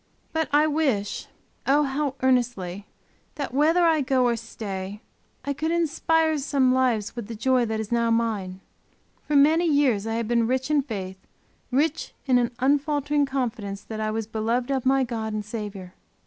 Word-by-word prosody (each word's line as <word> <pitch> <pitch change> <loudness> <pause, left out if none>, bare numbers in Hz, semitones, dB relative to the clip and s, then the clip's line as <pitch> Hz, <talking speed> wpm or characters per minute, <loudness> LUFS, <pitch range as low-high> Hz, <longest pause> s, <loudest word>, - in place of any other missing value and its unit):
But 320 -1 0
I 295 +1 +5
wish, 285 -10 0 0.4
oh 290 +2 +4
how 275 0 -1
earnestly, 235 -7 0 0.5
that 285 -4 -4
whether 320 +6 +3
I 320 -2 +3
go 260 -1 +2
or 240 -1 +2
stay, 205 -3 -6 0.5
I 285 - -1
could 315 +3 -2
inspire 325 -1 +1
some 270 -2 +2
lives 245 -5 +1
with 235 -4 -6
the 230 - -6
joy 250 +2 +2
that 220 0 -2
is 220 0 -5
now 235 -1 +2
mine. 210 -5 -1 0.7
For 300 - 0
many 315 +5 +5
years 255 -8 +2
I 225 - -1
have 230 -1 -2
been 235 -1 +2
rich 260 +3 -1
in 295 -1 +4
faith; 190 -8 -6 0.5
rich 295 +5 0
in 255 -3 +4
an 240 -1 +1
unfaltering 290 +1 +1
confidence 230 -7 -3
that 220 -1 -7
I 215 0 -1
was 220 0 -2
beloved 230 +4 -1
of 265 -2 0
my 270 0 +4
God 225 -3 -3
and 210 -1 -3
Saviour. 205 -4 -6
250 Hz, 175 wpm, -25 LUFS, 220-285 Hz, 0.7 s, I